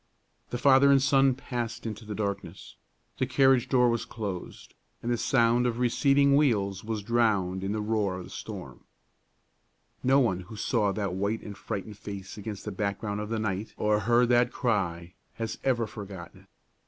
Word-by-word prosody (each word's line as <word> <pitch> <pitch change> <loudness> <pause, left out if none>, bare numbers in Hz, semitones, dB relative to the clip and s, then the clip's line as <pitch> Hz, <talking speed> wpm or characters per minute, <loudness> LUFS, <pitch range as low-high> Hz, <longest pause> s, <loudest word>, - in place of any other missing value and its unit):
The 120 - -3
father 135 +2 +5
and 140 -1 +6
son 135 -1 +4
passed 120 -3 -4
out - - -15
into 110 0 -5
the 105 -1 -5
darkness; 100 -1 -5 0.4
the 130 - +1
carriage 130 -1 +3
door 125 -2 +4
was 115 -1 0
closed, 100 -6 -7 0.3
and 120 - -1
the - - +3
sound 120 0 +3
of 120 -1 -2
receding 140 +3 +3
wheels 100 -10 +1
was 110 -1 -3
drowned 100 -5 +1
in 95 - -2
the 105 0 -1
roaring 105 -4 -1
of - - -9
the - - -13
storm. - - -8 1.2
No 135 +2 +5
one 115 -9 +1
who 95 +5 -10
saw 105 -1 +1
that 100 -2 -2
white 100 +4 -2
and 105 - -7
frightened 100 +1 -6
face 100 -2 -7
against 105 -1 -7
the 105 - -3
background 100 +1 -3
of 105 - -5
the 115 - -1
night 110 -1 -3
or 105 0 +2
heard 120 +3 +3
that 120 0 +4
cry 90 -8 -1 0.2
has 115 -1 -4
ever 120 -3 +1
forgotten 100 -5 -9
it. - - -22
110 Hz, 180 wpm, -28 LUFS, 100-120 Hz, 1.2 s, and